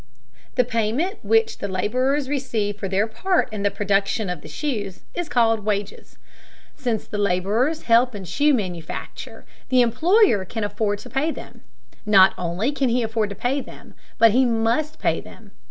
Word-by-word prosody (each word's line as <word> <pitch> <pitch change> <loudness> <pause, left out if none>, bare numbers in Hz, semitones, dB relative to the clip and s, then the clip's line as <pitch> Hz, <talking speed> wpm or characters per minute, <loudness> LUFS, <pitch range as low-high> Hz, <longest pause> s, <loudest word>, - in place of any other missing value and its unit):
The 250 - +4
payment 245 - -1
which 450 0 +2
the - - -3
laborers 255 +9 0
receive 225 -7 -2
for 195 - -3
their 195 +2 +1
part 235 - 0
in 210 - -4
the 200 - +2
production 200 0 0
of 175 -4 -6
the - - -11
shoes 210 -11 -4
is 350 -2 -4
called 225 -3 +3
wages. 205 -1 -4 0.6
Since 240 -5 -2
the 210 - -5
laborers 205 - 0
help 235 +1 +3
in 200 - -6
shoe 290 - +2
manufacture, 180 -7 -6 0.2
the 255 -1 +5
employer 310 - +3
can 220 +4 -5
afford 205 0 -1
to - - -9
pay 280 +4 0
them. - - -8 0.4
Not 195 -3 +6
only 180 +9 -1
can 275 -3 0
he 240 +1 +1
afford 220 -1 -1
to 200 - -6
pay 260 +7 -1
them, - - -13 0.2
but 230 -1 +6
he 255 +5 +4
must 235 +6 0
pay - - 0
them. 210 -3 -15
225 Hz, 170 wpm, -22 LUFS, 205-265 Hz, 0.6 s, Not